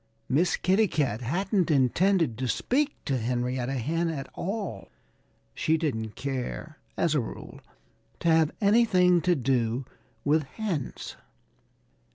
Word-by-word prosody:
Miss 165 Hz, +7 st, +2 dB
Kitty 195 Hz, +4 st, +3 dB
Cat 130 Hz, -, -1 dB
hadn't 185 Hz, -, 0 dB
intended 155 Hz, -, +3 dB
to 130 Hz, -, -1 dB
speak 285 Hz, -, 0 dB
to 135 Hz, -2 st, 0 dB
Henrietta 125 Hz, +2 st, -1 dB
Hen 165 Hz, +7 st, -1 dB
at 140 Hz, -4 st, -4 dB
all. 190 Hz, -, -4 dB, 0.7 s
She 160 Hz, +1 st, +1 dB
didn't 110 Hz, -9 st, -2 dB
care, 140 Hz, +3 st, -4 dB, 0.2 s
as 165 Hz, -, +2 dB
a 150 Hz, -, +3 dB
rule, 115 Hz, -, -8 dB, 0.6 s
to -, -, -1 dB
have 160 Hz, -1 st, +4 dB
anything 200 Hz, -5 st, +4 dB
to 180 Hz, 0 st, +2 dB
do 125 Hz, -2 st, 0 dB, 0.4 s
with 155 Hz, +2 st, +4 dB
hens. 175 Hz, -, -4 dB
155 Hz, 125 wpm, -27 LUFS, 125-180 Hz, 0.7 s, have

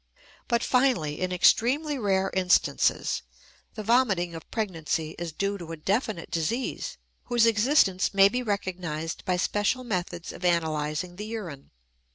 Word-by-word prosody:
But 235 Hz, 0 st, +1 dB
finally, 245 Hz, -, +1 dB
in 185 Hz, 0 st, -1 dB
extremely 270 Hz, -, +3 dB
rare 195 Hz, -3 st, +1 dB
instances, 185 Hz, -1 st, +2 dB, 0.5 s
the 215 Hz, -, -5 dB
vomiting 205 Hz, -7 st, +2 dB
of 165 Hz, -, -9 dB
pregnancy 165 Hz, -6 st, -2 dB
is 170 Hz, -1 st, -4 dB
due 200 Hz, +5 st, -2 dB
to 165 Hz, -2 st, -8 dB
a -, -, -6 dB
definite 200 Hz, -, -2 dB
disease 235 Hz, -, -2 dB, 0.3 s
whose 240 Hz, -2 st, +3 dB
existence 220 Hz, -4 st, +3 dB
may 195 Hz, 0 st, +6 dB
be 245 Hz, +5 st, -1 dB
recognized 180 Hz, -7 st, -3 dB
by 180 Hz, -2 st, +1 dB
special 205 Hz, +7 st, 0 dB
methods 180 Hz, -6 st, -4 dB
of -, -, -11 dB
analyzing 160 Hz, 0 st, 0 dB
the 210 Hz, -, -5 dB
urine. 180 Hz, -12 st, -7 dB
190 Hz, 140 wpm, -27 LUFS, 170-230 Hz, 0.5 s, may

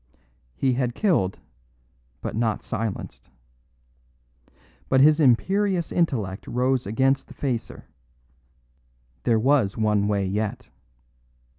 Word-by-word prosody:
He 130 Hz, -2 st, +1 dB
had 125 Hz, -1 st, -1 dB
killed, 160 Hz, -, +1 dB, 0.8 s
but -, -, -4 dB
not 110 Hz, -2 st, -1 dB
silenced. 110 Hz, -10 st, -5 dB, 1.6 s
But 130 Hz, -, +4 dB
his 150 Hz, +3 st, +6 dB
imperious 180 Hz, -, +2 dB
intellect 110 Hz, -, -1 dB
rose 125 Hz, 0 st, 0 dB
against 135 Hz, +5 st, +1 dB
the -, -, -14 dB
facer; 125 Hz, -5 st, -4 dB, 1.4 s
there 115 Hz, -, +3 dB
was 120 Hz, -4 st, +2 dB
one 105 Hz, -2 st, +1 dB
way 100 Hz, -2 st, 0 dB
yet. 110 Hz, +6 st, -3 dB
125 Hz, 100 wpm, -24 LUFS, 105-135 Hz, 1.6 s, his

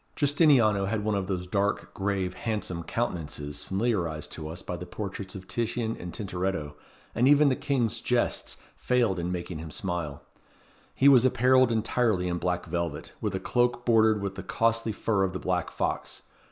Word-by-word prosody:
Giustiniano 140 Hz, -, +4 dB
had 105 Hz, 0 st, -1 dB
one 110 Hz, -, +1 dB
of 100 Hz, -2 st, -1 dB
those 90 Hz, -2 st, -2 dB
dark, 100 Hz, +2 st, -1 dB
grave, 95 Hz, -2 st, -1 dB
handsome 105 Hz, -7 st, -3 dB
countenances 75 Hz, -8 st, -3 dB
familiarized 95 Hz, -7 st, -1 dB
to 75 Hz, -2 st, -6 dB
us 85 Hz, +3 st, -7 dB
by 90 Hz, -, -4 dB
the 90 Hz, +1 st, -7 dB
portraits 100 Hz, -2 st, -6 dB
of 95 Hz, -1 st, -9 dB
Titian 115 Hz, -1 st, -1 dB
and 90 Hz, -, -7 dB
Tintoretto, 90 Hz, -7 st, -3 dB, 0.4 s
and 125 Hz, +3 st, +3 dB
even 145 Hz, 0 st, +6 dB
the 130 Hz, -, +2 dB
King's 140 Hz, -6 st, 0 dB
jests -, -, 0 dB, 0.2 s
failed 120 Hz, -7 st, +1 dB
in 85 Hz, +1 st, -2 dB
making 90 Hz, -2 st, -4 dB
him 80 Hz, 0 st, -7 dB
smile. 85 Hz, -4 st, -4 dB, 0.7 s
He 135 Hz, -, +4 dB
was 130 Hz, -4 st, +8 dB
apparelled 130 Hz, 0 st, +4 dB
entirely 110 Hz, -4 st, +1 dB
in 85 Hz, 0 st, -1 dB
black 90 Hz, 0 st, -1 dB
velvet, 85 Hz, -3 st, -3 dB
with 105 Hz, -3 st, -1 dB
a -, -, -1 dB
cloak 120 Hz, +1 st, +1 dB
bordered 110 Hz, -3 st, +4 dB
with 100 Hz, -1 st, -2 dB
the -, -, -6 dB
costly 115 Hz, 0 st, +1 dB
fur 105 Hz, -1 st, 0 dB
of 95 Hz, -1 st, -1 dB
the -, -, -2 dB
black -, -, -1 dB
fox. -, -, -3 dB
100 Hz, 175 wpm, -28 LUFS, 90-115 Hz, 0.7 s, was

